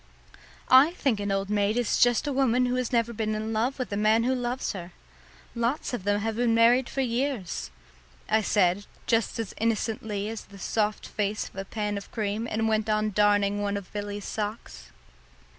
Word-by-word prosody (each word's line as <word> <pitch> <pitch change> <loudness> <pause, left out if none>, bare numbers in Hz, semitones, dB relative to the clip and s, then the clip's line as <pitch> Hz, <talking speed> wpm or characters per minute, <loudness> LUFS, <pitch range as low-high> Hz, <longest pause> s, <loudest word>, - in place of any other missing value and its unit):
"I 270 +6 +7
think 270 - 0
an 200 -1 -2
old 195 +1 -1
maid 205 +2 +1
is 245 -2 +1
just 245 +2 +4
a 290 - -1
woman 255 -2 +3
who 245 - 0
has 255 -1 -1
never 235 -1 +1
been 215 -1 -1
in 220 +1 -3
love 235 +5 0
with 255 -5 -4
a - - 0
man 215 +2 +3
who 255 +2 +2
loves 250 0 -2
her. 180 -2 -8 0.6
Lots 240 +5 -1
of 200 -6 -4
them 205 0 +1
have 220 +1 -2
been 235 -1 +2
married 240 +2 +4
for 270 - -2
years," 240 - -2 0.6
I 220 0 +3
said, 200 -1 +2 0.2
just 225 -1 +1
as 225 -3 -4
innocently 220 -2 -1
as 225 0 -6
the 200 - -14
soft 210 +1 -1
face 210 0 -2
of - - -24
a 195 0 -5
pan 210 0 -3
of 200 - -13
cream, 215 +1 -2
and 225 +1 0
went 220 0 0
on 215 0 +1
darning 205 0 +2
one 200 0 -1
of 200 -2 -9
Billy's 205 -1 -4
socks. 215 +1 -5
220 Hz, 195 wpm, -27 LUFS, 205-240 Hz, 0.6 s, I